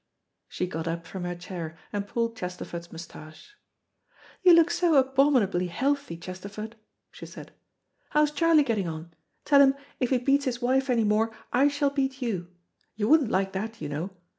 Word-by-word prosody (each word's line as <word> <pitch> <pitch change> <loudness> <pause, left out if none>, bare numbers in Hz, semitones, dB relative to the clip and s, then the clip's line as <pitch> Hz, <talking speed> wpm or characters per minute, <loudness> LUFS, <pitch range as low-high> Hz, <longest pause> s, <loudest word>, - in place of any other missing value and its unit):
'" - - -54
She - - -2
got 165 -2 -5
up 165 0 -3
from 180 +1 -6
her 175 0 -3
chair, 170 -2 -7 0.2
and 200 -1 -2
pulled 230 +1 -1
Chesterford's 180 -3 -6
moustache. 165 - -11 0.9
"You 360 -2 +7
look 335 0 +5
so 345 -3 +2
abominably 260 -9 +3
healthy, 275 0 -1
Chesterford," 200 +5 -8 0.4
she - - -10
said. - - -11 0.6
"How's 300 0 +3
Charlie 315 0 +4
getting 215 -8 -1
on? 165 +1 -7 0.3
Tell 280 -1 +6
him 270 -1 +5 0.2
if 250 - 0
he 260 - +3
beats 275 +3 +2
his 245 -2 -2
wife 265 +2 +1
anymore, 225 -2 +2 0.2
I 270 +3 +5
shall; 285 0 +1
beat 270 -1 -1
you. 205 -9 -3 0.5
You 210 0 -1
wouldn't 305 -6 +5
like 190 -1 0
that, 215 +3 -5
you 150 - -5
know. 155 +6 -3
225 Hz, 170 wpm, -27 LUFS, 180-275 Hz, 0.9 s, You